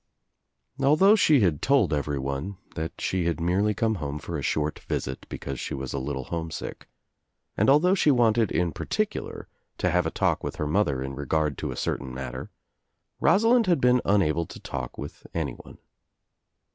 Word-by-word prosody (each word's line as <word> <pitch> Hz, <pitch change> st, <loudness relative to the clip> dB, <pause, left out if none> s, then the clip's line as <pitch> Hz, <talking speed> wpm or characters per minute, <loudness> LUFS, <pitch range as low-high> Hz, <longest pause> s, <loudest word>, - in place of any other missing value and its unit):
Although 155 Hz, +10 st, +6 dB
she 155 Hz, -, +5 dB
had 85 Hz, -7 st, +2 dB
told 135 Hz, -, +3 dB
everyone 70 Hz, +5 st, -2 dB, 0.2 s
that 80 Hz, 0 st, -5 dB
she 95 Hz, -2 st, -1 dB
had 85 Hz, 0 st, 0 dB
merely 95 Hz, +5 st, +1 dB
come 110 Hz, -3 st, 0 dB
home 70 Hz, 0 st, -3 dB
for 80 Hz, +3 st, -6 dB
a 75 Hz, -, -2 dB
short 75 Hz, +2 st, -1 dB
visit 65 Hz, -1 st, -4 dB
because 70 Hz, -2 st, -5 dB
she -, -, -4 dB
was 65 Hz, -1 st, -5 dB
a 70 Hz, -, -1 dB
little 65 Hz, 0 st, -3 dB
homesick, 80 Hz, +2 st, -5 dB, 0.7 s
and -, -, +3 dB
although 155 Hz, +7 st, +5 dB
she 180 Hz, -5 st, +3 dB
wanted 115 Hz, -5 st, +3 dB
in 90 Hz, -1 st, +1 dB
particular -, -, -3 dB, 0.3 s
to 90 Hz, -, +1 dB
have 90 Hz, +1 st, +2 dB
a -, -, 0 dB
talk -, -, 0 dB
with -, -, -4 dB
her 75 Hz, -, -2 dB
mother 75 Hz, -5 st, +1 dB
in 65 Hz, 0 st, -5 dB
regard 75 Hz, +1 st, 0 dB
to -, -, -3 dB
a -, -, -4 dB
certain 65 Hz, -2 st, -2 dB
matter, 65 Hz, 0 st, -6 dB, 0.7 s
Rosalind 225 Hz, +6 st, +4 dB
had 175 Hz, -4 st, +3 dB
been 125 Hz, 0 st, +4 dB
unable 85 Hz, -5 st, +2 dB
to -, -, -10 dB
talk -, -, -6 dB
with 70 Hz, -, -8 dB
anyone. -, -, -5 dB
85 Hz, 170 wpm, -26 LUFS, 70-120 Hz, 0.7 s, Although